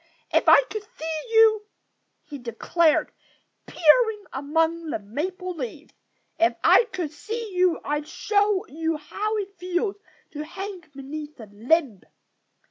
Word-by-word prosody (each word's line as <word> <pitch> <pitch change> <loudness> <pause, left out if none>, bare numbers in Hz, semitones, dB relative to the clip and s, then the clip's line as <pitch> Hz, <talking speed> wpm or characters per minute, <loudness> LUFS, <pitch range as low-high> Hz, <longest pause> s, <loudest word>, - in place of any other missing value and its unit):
If - - +4
I - - +8
could 430 - -3 0.2
see 315 0 -3
you 440 -2 +5 0.3
" - - -49
he 285 - -6
declared, 305 +7 +1 0.6
peering 420 +6 +3
among 325 +4 0
the - - -1
maple 360 - -4
leaves 285 -1 -7 0.5
"if 340 +1 +3
I - - +6
could 350 -9 -4
see 440 +7 -6
you 360 -2 +3
I'd 295 0 -2
show 410 +3 +1
you 320 +1 -2
how 425 +8 -3
it 400 -1 -5
feels 365 +3 -1 0.3
to 300 -1 -5
hang 380 +3 -7
beneath 295 +2 -8
a 220 - -8
limb." 235 - +1
330 Hz, 135 wpm, -25 LUFS, 295-400 Hz, 0.6 s, I